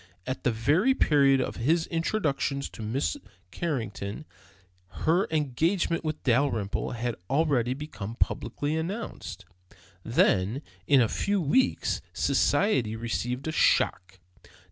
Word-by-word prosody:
At 130 - -4
the 125 - +2
very 150 - +2
period 140 - +4
of - - -3
his 160 +8 +2
introduction 160 -5 -1
to 125 - -7
Mrs. 125 - -1 0.3
Carrington 110 - -4 0.8
her 170 +5 +3
engagement 160 +4 0
with 155 -1 -4
Dalrymple 120 -6 0
had 120 0 -2
already 135 -5 +1
become 115 -7 -7
publicly 145 +4 -1
announced. 185 +8 -5 0.6
Then, 115 - +2 0.2
in 140 -3 +6
a 115 - +3
few 200 - 0
weeks, 175 - +1
society 125 - +2
received 120 +4 -3
a - - 0
shock. 95 -10 +2
140 Hz, 115 wpm, -27 LUFS, 115-160 Hz, 0.8 s, in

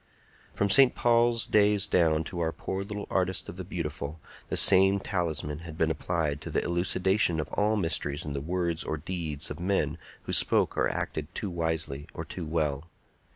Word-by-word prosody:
From 100 -1 +1
St. 130 +4 +6
Paul's 120 -1 +3
days 105 -1 +3
down 80 -3 +2
to 85 +1 -6
our 80 -1 0
poor 95 +3 -5
little 105 0 -6
Artist 95 -1 0
of 90 - -9
the 95 - -5
Beautiful, 80 -4 -5 0.3
the - - 0
same 95 +1 +6
talisman 80 -6 -2
had 80 -2 -10
been 80 0 +1
applied 80 -3 -2
to - - -7
the - - -1
elucidation 90 +1 +1
of 75 - -3
all 105 +1 +1
mysteries 80 -7 0
in 75 - -4
the 70 - -3
words 85 +1 -1
or 75 - -3
deeds 80 -2 -4
of - - -7
men 85 -4 -1 0.2
who - - -5
spoke - - +3
or - - +1
acted 75 -1 -4
too 100 - -3
wisely 80 -4 -2
or - - -5
too 85 -4 -7
well. 75 -2 -1
85 Hz, 185 wpm, -28 LUFS, 80-95 Hz, 0.3 s, St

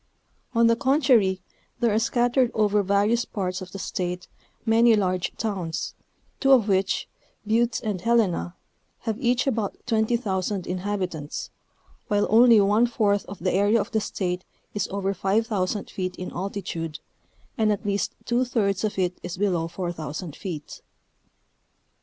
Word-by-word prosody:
On 230 0 +5
the 230 0 +5
contrary 245 - +3 0.4
there 235 -3 +2
are 215 - +3
scattered 245 +2 +2
over 210 -1 +3
various 200 +4 +2
parts 185 -4 -3
of 185 -1 -8
the - - -7
State 180 -1 -3 0.4
many 230 0 +5
large 185 -3 0
towns, 190 -7 -3 0.5
two 270 - +3
of 235 -5 +5
which, 195 -1 +1 0.4
Butte 230 +2 +2
and 205 -5 -2
Helena, 210 -6 +1 0.5
have 225 -1 -3
each 245 -1 +2
about 225 -7 -1
20,000 215 -5 0
inhabitants, 180 -5 -3 0.6
while 205 -2 +2
only 230 0 +7
one 210 +4 +4
fourth 205 -4 +1
of 200 - -7
the 185 +2 -1
area 205 +4 +3
of - - -3
the 220 -2 +1
State 185 -3 -2 0.3
is 205 -2 -1
over 195 0 -1
5,000 200 0 0
feet 185 -1 -3
in 180 - -6
altitude, 175 -4 -4 0.6
and 220 -3 +2
at 205 - -2
least 200 0 -1
two 240 +2 +2
thirds 210 -6 0
of 215 -2 -1
it 180 -1 0
is 180 - -6
below 180 -4 +1
4,000 165 -3 -5
feet. 165 -7 -7
205 Hz, 145 wpm, -25 LUFS, 185-225 Hz, 0.6 s, only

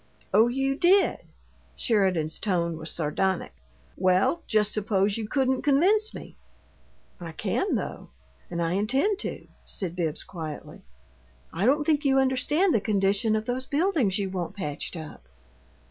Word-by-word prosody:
"Oh, 225 +2 +6
you 270 +2 0
did?" 370 +6 +3 0.6
Sheridan's 185 -8 +1
tone 170 -5 0
was 160 +1 -4
sardonic. 175 +4 -1 0.4
"Well, 190 - +2
just 210 -1 +2
suppose 200 -1 +1
you 220 -2 -4
couldn't 265 0 +1
convince 390 +10 +3
me." - - -10 0.8
"I 170 -2 -7
can, - - -1
though - - -5 0.4
and 170 0 -2
I 165 - -1
intend 265 - +1
to," - - -5 0.2
said 175 -3 -4
Bibbs, 165 -4 -2
quietly. 160 -5 -8 0.7
"I 190 +7 0
don't 295 +3 +3
think 300 -1 +2
you 270 -1 +3
understand 280 +7 +2
the 225 - +2
condition 205 +1 +1
of 215 0 -2
those 255 +2 -2
buildings 290 - +1
you 195 -2 -2
want 180 0 -4
patched 150 -2 -4
up." 150 - -10
215 Hz, 145 wpm, -26 LUFS, 180-270 Hz, 0.8 s, Oh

